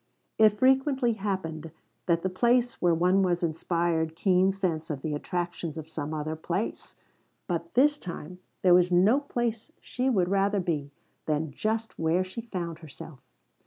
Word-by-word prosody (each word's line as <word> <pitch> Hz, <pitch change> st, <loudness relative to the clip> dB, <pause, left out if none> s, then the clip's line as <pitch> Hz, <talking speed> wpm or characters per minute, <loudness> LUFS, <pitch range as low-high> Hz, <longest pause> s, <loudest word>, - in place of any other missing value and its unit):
It 215 Hz, -1 st, +8 dB
frequently 260 Hz, +1 st, +3 dB
happened 185 Hz, -6 st, -4 dB, 0.4 s
that 170 Hz, -1 st, +2 dB
the 190 Hz, -, 0 dB
place 240 Hz, +5 st, +2 dB
where 175 Hz, -2 st, +3 dB
one 180 Hz, +4 st, +3 dB
was 180 Hz, -1 st, +1 dB
inspired 165 Hz, 0 st, 0 dB
keen 185 Hz, +1 st, +3 dB
sense 175 Hz, -5 st, -2 dB
of 145 Hz, -4 st, -4 dB
the 155 Hz, -, -2 dB
attractions 175 Hz, 0 st, -3 dB
of 160 Hz, -1 st, -6 dB
some 155 Hz, -2 st, -5 dB
other 155 Hz, 0 st, -3 dB
place. 175 Hz, +6 st, -4 dB, 0.5 s
But 170 Hz, -1 st, -4 dB
this 290 Hz, +3 st, +4 dB
time 180 Hz, 0 st, -8 dB, 0.2 s
there 180 Hz, -2 st, +6 dB
was 180 Hz, 0 st, +4 dB
no 195 Hz, +10 st, +5 dB
place 240 Hz, -5 st, -3 dB
she 255 Hz, +1 st, -2 dB
would 190 Hz, -8 st, +2 dB
rather 200 Hz, +1 st, +2 dB
be 155 Hz, -6 st, -2 dB, 0.4 s
than 155 Hz, 0 st, -1 dB
just 220 Hz, +8 st, -3 dB
where 165 Hz, +3 st, +2 dB
she 185 Hz, +5 st, -7 dB
found 175 Hz, -7 st, -5 dB
herself. 155 Hz, -3 st, -11 dB
180 Hz, 160 wpm, -27 LUFS, 160-215 Hz, 0.5 s, It